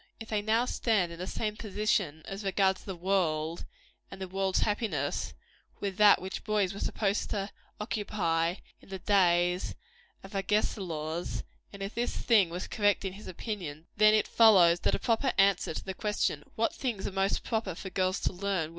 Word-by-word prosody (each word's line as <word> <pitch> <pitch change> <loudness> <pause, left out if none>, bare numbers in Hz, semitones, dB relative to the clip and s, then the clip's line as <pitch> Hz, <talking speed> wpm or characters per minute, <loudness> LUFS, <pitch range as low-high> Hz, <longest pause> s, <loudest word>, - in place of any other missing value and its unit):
If 225 - -9
they 215 -1 0
now 220 +3 +2
stand 215 -8 +1
in 170 - -9
the 185 - -4
same 210 +1 -2
position, 205 -7 -1
as 195 +2 -6
regards 195 -1 +1
the 190 - -6
world 170 -3 0 0.4
and 195 - -10
the 190 - -4
world's 190 0 0
happiness, 205 - -1 0.4
with 195 -2 -3
that 210 -1 +7
which 190 +1 -6
boys 210 -4 +1
were 200 - -7
supposed 205 -1 -1
to 200 -1 -3 0.3
occupy 180 -6 -1 0.3
in - - -19
the 190 - -5
days 180 -2 +2 0.5
of 195 - -11
Agesilaus, 180 -5 -1 0.3
and 200 -1 -7
if 195 - -5
this 240 +1 -2
thing 210 -7 +4
was 175 +2 -5
correct 205 -2 +1
in 190 - -3
his 205 +2 -11
opinion, 175 -6 -6
then 215 +1 +6
it 215 - +2
follows 185 -7 +6
that - - +1
a - - 0
proper 235 +3 +1
answer 195 -4 +3
to - - -5
the 190 - -4
question, 205 -8 -1
What 225 +1 +1
things 235 -8 -3
are - - -2
most 195 +1 0
proper 220 -6 -2
for 190 +2 -7
girls 185 +1 0
to - - 0
learn? 185 -4 -1
195 Hz, 180 wpm, -30 LUFS, 180-210 Hz, 0.5 s, that